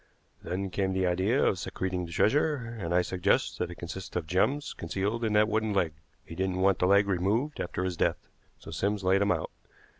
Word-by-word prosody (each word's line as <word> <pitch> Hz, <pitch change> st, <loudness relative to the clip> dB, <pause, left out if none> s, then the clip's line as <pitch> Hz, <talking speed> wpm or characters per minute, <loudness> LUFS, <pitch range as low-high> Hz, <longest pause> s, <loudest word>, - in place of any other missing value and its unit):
Then 95 Hz, +1 st, -3 dB
came 95 Hz, 0 st, 0 dB
the 95 Hz, 0 st, +1 dB
idea 95 Hz, +9 st, +2 dB
of 95 Hz, -, +1 dB
secreting 90 Hz, -1 st, -3 dB
the -, -, -11 dB
treasure, 150 Hz, -, +3 dB, 0.2 s
and 85 Hz, -4 st, -4 dB
I 90 Hz, +1 st, +3 dB
suggest 90 Hz, +2 st, 0 dB
that -, -, -1 dB
it 85 Hz, -, -8 dB
consists 85 Hz, +2 st, -7 dB
of 90 Hz, -, -1 dB
gems 100 Hz, -, 0 dB
concealed 100 Hz, +7 st, -2 dB
in 110 Hz, -2 st, 0 dB
that 105 Hz, 0 st, +5 dB
wooden 110 Hz, -1 st, 0 dB
leg. 85 Hz, -5 st, +1 dB, 0.3 s
He -, -, -9 dB
didn't 95 Hz, +1 st, -1 dB
want 95 Hz, -1 st, +3 dB
the 90 Hz, -, +3 dB
leg 100 Hz, +1 st, +5 dB
removed 100 Hz, +10 st, 0 dB
after 90 Hz, +1 st, -3 dB
his 90 Hz, -2 st, -2 dB
death, -, -, 0 dB, 0.3 s
so -, -, -11 dB
Sims 100 Hz, +4 st, -1 dB
laid 95 Hz, +2 st, +3 dB
him 100 Hz, -, +3 dB
out. -, -, -1 dB
95 Hz, 210 wpm, -29 LUFS, 90-105 Hz, 0.3 s, that